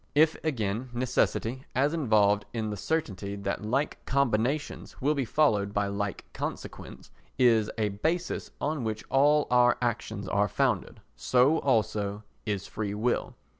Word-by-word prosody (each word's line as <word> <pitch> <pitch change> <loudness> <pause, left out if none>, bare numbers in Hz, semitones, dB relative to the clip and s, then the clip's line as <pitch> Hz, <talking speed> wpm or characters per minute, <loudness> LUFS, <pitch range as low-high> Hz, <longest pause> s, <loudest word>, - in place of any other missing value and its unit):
If, 155 +2 +5
again, 120 -5 -2
necessity, 130 0 0
as 140 +4 +2
involved 105 -9 +3
in 110 -2 -2
the - - -3
certainty 100 - -2
that 100 +1 -3
like 135 +7 -1
combinations 135 +2 0
will 145 +3 +2
be 140 -3 -1
followed 105 -8 +2
by 100 -1 +1
like 100 -1 -3
consequence, - - -7 0.3
is 115 -4 +4
a 105 -2 +1
basis 160 - -2
on 150 -2 -1
which 110 -1 -3
all 145 +3 +4
our 120 0 +5
actions 115 -4 -2
are 100 +2 +2
founded, - - -1
so 130 +6 +3
also 105 -5 0 0.2
is 100 -2 -1
freewill. 105 +3 -2
115 Hz, 135 wpm, -28 LUFS, 105-140 Hz, 0.3 s, If